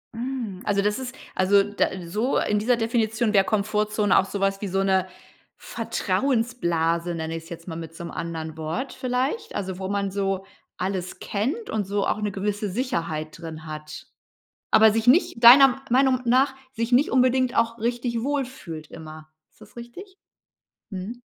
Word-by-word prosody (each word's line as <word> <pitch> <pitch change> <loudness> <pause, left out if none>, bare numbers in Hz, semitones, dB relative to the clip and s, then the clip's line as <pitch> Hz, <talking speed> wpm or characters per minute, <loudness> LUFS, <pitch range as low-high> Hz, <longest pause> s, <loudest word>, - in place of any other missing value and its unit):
Hm, 235 -6 -4
also, 200 -1 +1
das 210 +4 0
ist 255 0 -6 0.2
also, 195 +2 +4
da 205 +1 0 0.2
so 215 +9 0
in 210 0 +1
dieser 240 +3 +2
Definition 225 -1 0
der 195 -2 +5
Komfortzone 210 0 +1
auch 190 - +4
sowas 195 0 -1
wie 205 - -2
so 195 +1 0
'ne 190 -1 +2 0.5
„Vertrauensblase“, 175 -10 -1
nenne 160 0 -4
ich 165 - -6
es 165 - -15
jetzt 170 0 -9
mal 165 - -5
mit 165 0 -8
so 170 - -8
'nem 170 - -6
anderen 160 -2 -5
Wort 160 - -4
vielleicht? 255 - -2
Also, 190 -2 -4
wo 190 - -3
man 200 0 -1
so 195 -1 -2 0.3
alles 185 -1 -3
kennt 275 - -3
und 215 -2 -1
so 200 0 0
auch 215 - -1
'ne 210 -1 -1
gewisse 205 +1 -2
Sicherheit 170 - -3
drin 160 -2 -8
hat. 155 -1 -8 0.6
Aber 220 0 +7
sich 225 +1 -1
nicht, 250 -4 +3
deiner 270 +2 +9
Meinung 260 0 +3
nach 260 +3 +3 0.2
sich 230 -1 -3
nicht 255 +4 +4
unbedingt 255 0 +3
auch 230 0 +1
richtig 235 0 -2
wohlfühlt 255 - -4
immer. 155 -1 -10 0.2
Ist - - -31
das - - -16
richtig? 300 +12 -10 0.8
Mhm. 200 +6 -6
210 Hz, 170 wpm, -24 LUFS, 185-245 Hz, 0.8 s, deiner